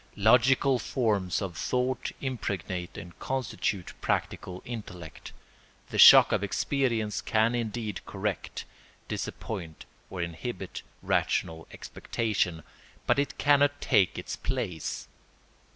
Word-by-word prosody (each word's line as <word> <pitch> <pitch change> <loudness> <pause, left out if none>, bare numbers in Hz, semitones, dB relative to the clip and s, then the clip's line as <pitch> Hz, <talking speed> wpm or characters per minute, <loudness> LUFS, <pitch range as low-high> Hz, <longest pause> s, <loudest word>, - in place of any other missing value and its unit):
Logical 130 +4 +4
forms 105 -8 0
of 90 -3 -5
thought 125 +4 -1
impregnate 100 -8 -4
and 85 0 -10
constitute 115 -7 -2
practical 90 0 -2
intellect. 95 -9 -8 0.6
The - - -2
shock - - +10
of - - +1
experience 115 -8 0
can 110 +2 +2
indeed 115 -3 -3
correct, - - -4 0.4
disappoint, 85 -7 -5 0.2
or 95 - -7
inhibit 85 +6 -5 0.2
rational 80 0 0
expectation, 95 -8 -2 0.4
but - - +3
it 140 - -1
cannot 145 0 +3
take 100 -8 +3
its - - -4
place. 80 -4 -4
110 Hz, 105 wpm, -28 LUFS, 90-125 Hz, 0.6 s, shock